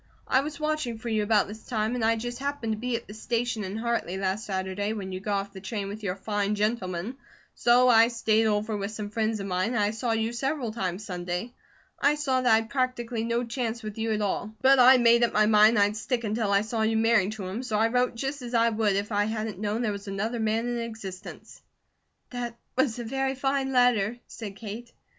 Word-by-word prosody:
I 260 - +3
was 295 +1 -6
watching 305 -6 -1
for 235 +1 -6
you 220 -1 +1
about 210 -1 +3
this 215 +2 -9
time, 220 -1 -1
and 245 -2 -2
I 225 +1 +3
just 240 +2 -5
happened 280 -5 -2
to - - -4
be 245 +1 -1
at 230 - -4
the 210 - -9
station 230 0 -2
in 195 +2 -4
Hartley 230 -5 -1
last 195 +3 -2
Saturday 190 +2 -2
when 195 -3 -5
you 185 - -4
got 200 +1 -1
off 200 0 -11
the 190 - -9
train 200 0 -4
with 210 +2 -7
your 185 -3 -2
fine 205 +1 -1
gentleman, 210 +1 -2 0.4
so 245 +1 +4
I 230 -2 +7
stayed 225 -2 +2
over 215 +1 0
with 200 -1 -3
some 210 -1 -6
friends 220 0 0
of 195 - -4
mine, 185 +5 -1
and - - +1
I 205 -1 +2
saw 225 +2 -2
you 225 +1 -1
several 265 -1 -2
times 190 -2 -3
Sunday. 180 +4 -4 0.5
I 290 +1 +3
saw 270 -3 0
that 250 -1 +3
I'd 220 0 +3
practically 250 -3 -1
no 235 +1 0
chance 235 -1 -3
with 215 0 -6
you 225 0 0
at 215 -1 0
all; 205 +2 -2
but 270 0 +6
I 255 +1 +8
made 235 -1 +5
up 235 - +2
my 215 0 +4
mind 215 +1 +6
I'd 205 +1 +3
stick 235 +3 -2
until 215 -1 -1
I 200 0 +4
saw 220 +1 -2
you 220 0 +2
marry 220 -3 +3
him, 205 +1 -5
so 235 -5 -2
I 225 +1 +3
wrote 250 0 +1
just 270 +3 -3
as 245 0 -5
I 230 0 +4
would 215 -3 +1
if 200 +3 -2
I 205 0 +2
hadn't 220 -2 -3
known 215 +3 -1
there 215 - +1
was 200 0 -7
another 215 +5 -2
man 220 +2 0
in 240 0 -2
existence." 220 -5 -8 0.7
"That 240 -2 -5 0.2
was 260 -3 +1
a 240 - -4
very 270 +3 -1
fine 270 0 0
letter," 245 -3 +3
said 205 -4 -8
Kate. 230 +3 -8
225 Hz, 230 wpm, -27 LUFS, 205-240 Hz, 0.7 s, I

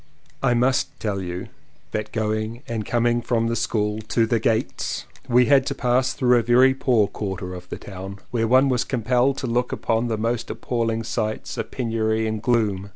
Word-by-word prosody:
I 120 - +3
must 130 +3 +1
tell 100 -3 -2
you 90 0 -5 0.4
that 105 0 -3
going 110 +2 -2
and 110 -3 -3
com 120 0 +1
ing 120 0 +2
from 115 -1 0
the 115 0 0
school 105 -2 -1
to 115 0 +2
"The 115 0 +1
Gates" 110 0 -1 0.2
we 125 +1 +5
had 140 0 +5
to 140 - -2
pass 125 +1 +1
through 125 -1 +3
a - - +1
very 125 +3 +5
poor 125 -5 +2
quarter 95 -3 -5
of 90 0 -9
the - - -5
town, 95 0 -8
where 115 -2 +1
one 130 +4 +5
was 125 -2 +1
compelled 125 +2 +1
to - - -3
look 125 +1 0
upon 115 +1 0
the 110 -2 -1
most 115 +2 -1
appalling 115 -2 -1
sights 110 -1 -3
of - - -4
penury 110 -3 0
and 110 -1 -2
gloom. 105 -5 +1
115 Hz, 195 wpm, -23 LUFS, 110-125 Hz, 0.4 s, we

